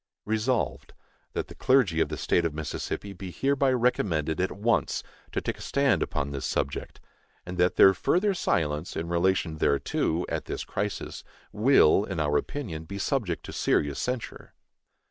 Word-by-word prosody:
Resolved, 110 +4 -1 0.4
That - - -2
the - - -10
clergy 125 -12 +3
of - - +1
the - - -4
State 85 - +1
of 80 -3 -1
Mississippi 80 +6 -4
be 95 0 -7
hereby 135 - +1
recommended 90 - +1
at 95 - 0
once 115 +4 0 0.3
to - - -1
take - - -4
a - - -10
stand 140 -1 +2
upon 70 -4 -2
this 70 -2 -3
subject; 70 - -3 0.5
and 90 0 -6
that 90 0 +3
their 95 - +8
further 190 - +2
silence 75 - -1
in 80 +1 -3
relation 85 -2 +1
thereto, 70 +4 +1
at - - -3
this - - -4
crisis, 100 0 -4 0.3
will, 105 - +5
in 95 -4 -4
our 75 -1 +1
opinion, 80 - -3
be 100 +5 -6
subject 100 - -1
to - - -8
serious 70 -2 +1
censure. 125 -2 -4
90 Hz, 165 wpm, -27 LUFS, 80-120 Hz, 0.5 s, their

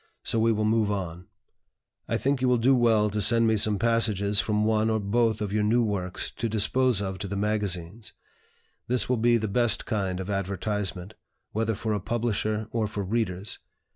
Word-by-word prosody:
So 115 - -1
we 115 +1 +3
will 110 -1 0
move 110 -1 +2
on. 90 -3 -4 0.8
"I - - 0
think 140 -1 0
you 130 - +2
will 125 -1 +3
do 125 +4 +3
well 110 -4 +3
to 105 +1 -1
send 115 +3 +4
me 110 -1 +3
some 105 0 +4
passages 105 -2 +1
from 105 -1 0
one 110 0 +2
or 110 0 +1
both 110 +1 0
of 100 -1 -4
your 105 - +1
new 115 +3 +2
works 95 -4 -3
to 115 - -2
dispose 110 +1 +2
of 95 -1 -4
to 100 - -4
the 100 - -4
magazines. 105 -1 -3 0.8
This 125 0 +1
will 125 - +1
be 120 +1 +3
the 110 -1 -2
best 115 +1 +2
kind 95 -5 -2
of 95 - -5
advertisement, 100 -1 -3 0.4
whether 110 0 -1
for 110 +2 -2
a 105 - -1
publisher 110 0 -2
or 115 -2 -1
for 105 -1 -4
readers. 100 -2 -2
105 Hz, 195 wpm, -26 LUFS, 100-115 Hz, 0.8 s, send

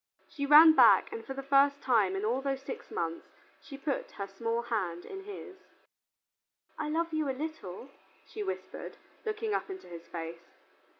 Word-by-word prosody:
She 280 -1 -4
ran 310 +2 +10
back - - +6
and 450 0 -6
for 270 - -6
the 275 - -5
first 280 +1 +4
time 215 -7 +3
in 195 +2 -2
all 245 +5 0
those 270 -1 -2
six 270 - -7
months 165 0 -3 0.3
she 275 - -10
put 280 0 -3
her 200 - -4
small 230 +4 -2
hand 185 -8 -2
in 385 0 -8
his. 390 -2 -9 1.2
"I 300 - -3
love 330 +1 -1
you 310 -2 0
a 260 - -2
little," 275 - -6 0.3
she 430 - -7
whispered, 385 -2 -5 0.3
looking 430 0 -2
up - - -2
into 380 -1 -8
his 170 -1 -10
face. 165 0 -8
275 Hz, 175 wpm, -31 LUFS, 200-320 Hz, 1.2 s, ran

